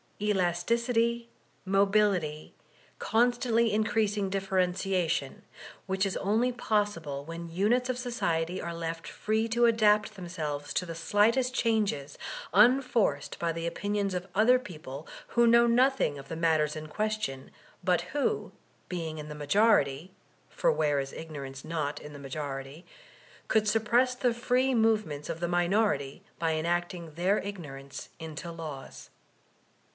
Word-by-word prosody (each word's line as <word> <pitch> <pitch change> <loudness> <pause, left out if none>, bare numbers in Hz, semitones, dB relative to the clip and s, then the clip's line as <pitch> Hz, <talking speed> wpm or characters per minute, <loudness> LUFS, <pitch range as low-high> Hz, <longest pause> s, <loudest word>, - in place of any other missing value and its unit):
^ - - -3
elasticity, 230 +6 +1 0.3
mobility, 195 -5 +1 0.4
constantly 235 0 +2
increasing 210 -2 +1
differentiation; 185 -5 0 0.5
whidi 190 +1 +1
is 190 - -3
only 225 +6 +1
possible 205 - -1
when 165 +1 -7
units 230 +8 +1
of 255 - -1
society 180 -9 -1
are 170 - -4
left 165 0 -5
free 220 +1 -1
to 235 +1 +3
adapt 215 -2 +3
themselves 155 -6 -5
to 180 - 0
the 165 - -5
slightest 220 +9 +2
changes, 210 - 0 0.3
unforced 225 - +3
by 170 -1 0
the 165 0 -4
opinions 205 +2 -1
of 180 +1 -3
other 230 +5 +6
people 155 - -9 0.2
who 235 0 +4
know 235 +1 +6
nothing 250 - +3
of 140 0 -11
the 165 - -4
matters 160 -2 +2
in 155 0 -6
question, 210 -7 -3 0.3
but 180 -1 +2
who, 285 +9 -1 0.4
being 165 -3 -4
in 150 - -7
the 150 - -7
majority 150 -1 +2 0.4
(for - - +1
where 145 - +1
is 135 0 -4
ignorance 140 -4 -7
not 155 -3 -2
in 150 - -10
the 145 - -9
majority?) 140 +2 -6 0.6
could 215 -1 +2
suppress 230 +4 +3
the 250 -1 +1
free 250 +2 +1
movements 215 - +1
of 165 -1 -3
the 175 - -1
minority 175 -3 +1 0.2
by 165 -1 +1
enacting 170 0 -2
their 185 +6 +2
ignorance 145 -9 -7
into 160 +1 -6
laws. 155 -5 -8
185 Hz, 135 wpm, -29 LUFS, 160-220 Hz, 0.6 s, other